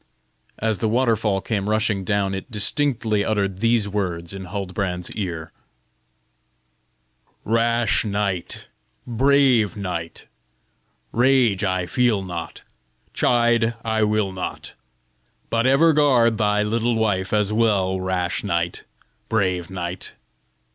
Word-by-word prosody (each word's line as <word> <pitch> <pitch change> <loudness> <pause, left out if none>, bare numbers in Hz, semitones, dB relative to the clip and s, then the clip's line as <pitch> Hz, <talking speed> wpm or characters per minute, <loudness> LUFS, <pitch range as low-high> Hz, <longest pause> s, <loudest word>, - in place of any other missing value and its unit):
As 110 -3 -1
the 110 - 0
waterfall 115 -4 +1
came 105 -2 -2
rushing 110 -2 +1
down, 100 -1 0
it 95 +6 -6
distinctly 110 -1 0
uttered 100 -3 -1
these 115 -1 +2
words 90 -4 -3
in 95 -1 -7
Huldbrand's 90 -2 -4
ear: 85 -6 -5 1.9
"Rash 115 +1 +2
knight, 100 -4 -2 0.4
Brave 125 -4 +3
knight, 85 -4 -5 0.9
Rage, 120 -5 +3 0.2
feel 120 -4 +2
I - - -7
not, 85 -3 -6 0.5
Chide, 120 -1 +2
will 110 -2 +1
I - - -11
not. 95 - -6 0.8
But 115 +2 +2
ever 155 +5 +5
guard 125 -7 +3
thy 105 -1 +2
little 115 +2 0
wife 100 -4 0
as 105 -1 +1
well, 100 -4 +2
Rash 95 0 -1
knight, 85 -4 -2 0.4
brave 90 -6 0
knight! 90 -1 -5
105 Hz, 110 wpm, -22 LUFS, 95-115 Hz, 1.9 s, ever